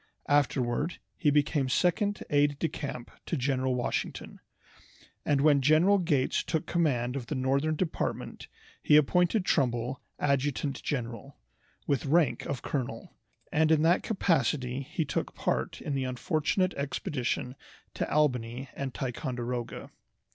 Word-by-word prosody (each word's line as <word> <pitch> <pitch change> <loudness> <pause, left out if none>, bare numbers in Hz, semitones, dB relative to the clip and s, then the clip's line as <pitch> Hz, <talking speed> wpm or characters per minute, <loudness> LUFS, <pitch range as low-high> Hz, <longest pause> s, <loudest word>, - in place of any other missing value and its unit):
Afterward 135 +1 +1 0.2
he 155 - +2
became 145 -2 +2
second 190 +8 +1
aide 145 0 +3
de 165 - 0
camp 135 -6 -6 0.2
to 165 - -1
General 130 -1 0
Washington, 125 - -3 0.8
and 140 -2 +2
when 145 -2 +5
General 160 +8 +5
Gates 150 -7 +1
took 160 -3 -2
command 130 -7 0
of 125 -4 -4
the 150 - -3
northern 140 +4 +1
department 165 0 -3 0.3
he 150 - +6
appointed 180 +6 +3
Trumbull 125 -2 0 0.2
adjutant 140 0 0
general, 125 0 -4 0.5
with 140 0 0
rank 145 -5 +2
of 140 - -4
colonel, 130 -4 -4 0.4
and 160 +1 +3
in 155 -1 +4
that 170 +2 +4
capacity 135 - 0
he 150 +4 -3
took 140 - -3
part - - -1
in 145 - -4
the 135 -1 -1
unfortunate 155 +8 0
expedition 130 -2 -2 0.4
to - - -3
Albany 125 -3 0
and 135 -2 -5
Ticonderoga. 125 -2 -4
140 Hz, 130 wpm, -29 LUFS, 125-155 Hz, 0.8 s, he